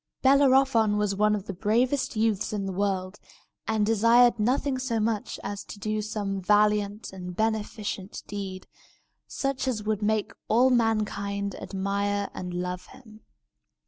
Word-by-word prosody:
Bellerophon 265 -5 +4
was 210 -1 +1
one 210 +1 +2
of 205 -2 -5
the 200 - -5
bravest 235 +8 +1
youths 215 -2 0
in 200 -2 -2
the 195 - -3
world, 190 0 -2 0.5
and 220 -1 +1
desired 230 +2 +5
nothing 260 +4 +1
so 245 -3 -1
much 215 -1 -2
as 200 0 -5
to - - -9
do 215 +1 -2
some 205 -2 -3
valiant 210 +1 +2
and 180 -1 -7
beneficent 210 -2 -3
deed, 195 -2 -6 0.6
such 275 -1 -2
as 225 -5 -1
would 215 -1 -1
make 215 0 0 0.2
all 250 +4 +4
mankind 205 -4 0
admire 200 +1 -2
and 180 -1 -6
love 180 +1 -4
him. 220 -4 -15
210 Hz, 145 wpm, -27 LUFS, 200-225 Hz, 0.6 s, desired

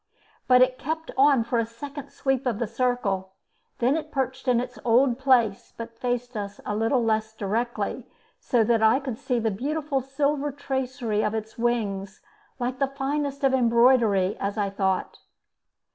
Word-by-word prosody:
but 250 0 +7
it 255 0 0
kept 320 +2 -4
on 275 -3 +5
for 235 +1 0
a 230 - +1
second 280 +4 -8
sweep 270 -1 -1
of 235 -4 0
the 235 - -1
circle. 220 -5 -1 0.4
Then 250 +4 +2
it 310 -1 -4
perched 260 -1 -3
in 245 -2 +4
its 250 - -5
old 245 +1 +3
place, 245 -7 +2
but 230 0 -8
faced 245 0 -2
us 205 -1 -5
a 205 - -2
little 225 +3 +1
less 220 -1 0
directly, 225 +4 -2 0.3
so 240 -4 +2
that 225 0 +2
I 220 +4 +5
could 260 -5 -5
see 250 - -1
the 225 -1 0
beautiful 280 +5 -2
silver 280 +2 -1
tracery 260 -5 -2
of 215 - 0
its 220 0 -5
wings, 200 -5 -1 0.4
like 255 0 -3
the 275 - +2
finest 280 +1 -3
of 270 -1 +3
embroidery, 235 -5 +4
as 200 +2 -3
I 200 -2 0
thought. 190 -1 -1
245 Hz, 170 wpm, -25 LUFS, 220-270 Hz, 0.4 s, but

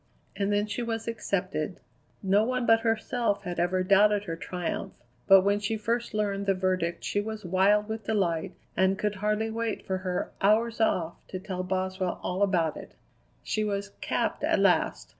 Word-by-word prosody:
And 200 0 0
then 205 0 +2
she 215 +3 -4
was 225 -1 -3
accepted. 185 -7 -2 0.4
No 200 +2 +4
one 250 +1 -1
but 225 -1 +5
herself 225 -2 0
had 175 -2 -4
ever 180 +2 +1
doubted 205 +2 +4
her 165 -5 -4
triumph, 175 +1 -4 0.3
but 195 -1 +8
when 200 +2 +2
she 210 +2 -1
first 230 +2 -2
learned 200 -1 -1
the 195 - +3
verdict 185 -2 -1
she 205 - 0
was 215 -1 -6
wild 195 +4 +3
with 220 -1 -5
delight 190 -4 0 0.2
and 190 +1 +2
could 210 +1 -1
hardly 210 +2 -1
wait 225 -1 -3
for 190 -1 -2
her 185 -1 -3
"hours 225 +3 +3
off" 170 -6 +1
to 185 - -5
tell 185 -1 -4
Boswell 185 0 -2
all 180 +2 -2
about 175 -6 +2
it. - - -11 0.5
She 215 - -1
was 200 -1 -2
"capped" - - -1
at - - +3
last. - - +2
200 Hz, 180 wpm, -28 LUFS, 185-215 Hz, 0.5 s, but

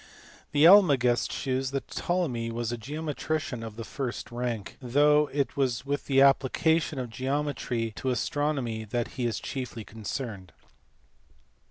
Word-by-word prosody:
The 145 +2 +4
Almagest 140 - +5
shews 130 0 -1
that 135 0 -4
Ptolemy 140 -11 -1
was 115 0 -3
a - - -1
geometrician 150 +1 -3
of 110 -2 -7
the 115 - -6
first 125 0 -5
rank, 120 -4 -4
though 145 +4 +4
it 140 0 0
is 130 -3 0
with 145 +1 -2
the 135 -1 +4
application 150 +3 +3
of 125 -3 -4
geometry 130 -3 -2
to 130 - -2
astronomy 130 -3 -1
that 115 +2 -2
he 125 -2 -2
is 115 - -2
chiefly 125 -4 -5
concerned. 105 -3 -6
130 Hz, 140 wpm, -28 LUFS, 120-145 Hz, -, Almagest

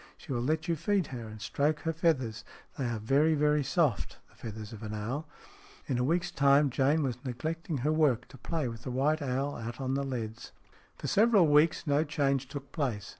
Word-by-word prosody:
She 140 - -6
will 120 - -1
let 155 +6 0
you 170 - +1
feed 185 +3 +1
her 120 -3 -5
and 110 0 -9
stroke 150 +8 0
her 165 -1 -1
feathers. 135 -10 0 0.3
They 135 - -2
are 120 -1 -1
very, 140 +9 +3
very 150 0 +2
soft, 140 - 0
the - - -24
feathers 110 -1 -8
of 110 - -9
an 110 -1 -5
owl." 125 +9 -3 0.6
In 125 -3 -1
a - - +2
week's 175 +6 +1
time 140 0 +4
Jane 140 +5 +2
was 125 -2 -3
neglecting 155 +5 -3
her 155 - +3
work 140 -7 +2
to 135 - -13
play 155 +1 -2
with 115 -1 -7
the 130 - -6
white 145 +5 +1
owl 135 +1 -1
out 115 +1 -6
on 130 -1 -1
the 140 - 0
leads. 115 -5 -5 0.4
VII - - -17
FOR - - -3
several 210 -5 +5
weeks 150 +2 +4
no 145 0 +3
change 140 -3 0
took 140 0 -8
place. 115 -9 -2
140 Hz, 215 wpm, -30 LUFS, 120-155 Hz, 0.6 s, several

